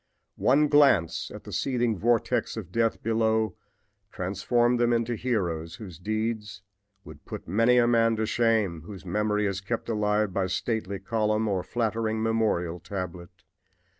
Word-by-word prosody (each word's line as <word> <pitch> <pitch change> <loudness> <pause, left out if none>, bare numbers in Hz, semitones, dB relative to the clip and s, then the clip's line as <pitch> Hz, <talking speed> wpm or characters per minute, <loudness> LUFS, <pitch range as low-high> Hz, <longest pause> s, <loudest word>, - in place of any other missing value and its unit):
One 145 +4 +4
glance 120 - +3
at 105 - -9
the 105 - -9
seething 120 +2 0
vortex 115 +3 0
of 90 - -7
death 115 +1 0
below 110 -1 +1 0.6
transformed 120 +6 +1
them 120 0 +3
into 115 0 +1
heroes 90 -10 -2
whose 95 -8 -10
deeds 110 0 -3 0.4
would 75 -1 -13
put - - -8
many 115 +7 +3
a 120 - +5
man 115 -1 +3
to 110 0 -1
shame 110 -7 +1
whose 95 +1 -10
memory 105 +3 0
is 100 -1 -2
kept 115 +4 -4
alive 105 -2 +1
by 95 -1 0
stately 100 +1 -2
column 110 +2 0
or 95 -3 0
flattering 110 0 -1
memorial 105 -7 0
tablet. 90 -2 -7
110 Hz, 145 wpm, -27 LUFS, 95-115 Hz, 0.6 s, a